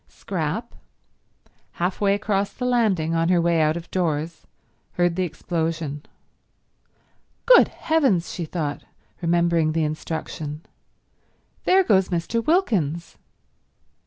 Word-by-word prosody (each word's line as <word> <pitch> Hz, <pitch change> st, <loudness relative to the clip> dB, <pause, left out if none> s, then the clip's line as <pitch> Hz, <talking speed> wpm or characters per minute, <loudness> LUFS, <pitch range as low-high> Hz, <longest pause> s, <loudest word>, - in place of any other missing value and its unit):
Scrap, -, -, -4 dB, 1.0 s
half 180 Hz, +3 st, -2 dB
way 200 Hz, -1 st, +3 dB
across 200 Hz, -1 st, -1 dB
the 250 Hz, -, -5 dB
landing 210 Hz, -10 st, +1 dB
on 165 Hz, +1 st, +1 dB
her 180 Hz, -1 st, +4 dB
way 170 Hz, -1 st, +2 dB
out 155 Hz, +1 st, +2 dB
of 170 Hz, -, -9 dB
doors, 165 Hz, -2 st, -2 dB, 0.5 s
heard 175 Hz, -1 st, +1 dB
the 185 Hz, -, -1 dB
explosion. 160 Hz, -3 st, -3 dB, 1.4 s
"Good -, -, +7 dB
heavens," 270 Hz, -, +1 dB
she 170 Hz, -, -4 dB
thought, 155 Hz, -3 st, -4 dB, 0.4 s
remembering 170 Hz, -2 st, +2 dB
the 165 Hz, 0 st, +1 dB
instruction, 155 Hz, -1 st, -4 dB, 1.0 s
"there 380 Hz, +1 st, +5 dB
goes 190 Hz, -, +3 dB
Mr. 185 Hz, +6 st, -1 dB
Wilkins!" 190 Hz, -, 0 dB
170 Hz, 110 wpm, -23 LUFS, 160-200 Hz, 1.4 s, Good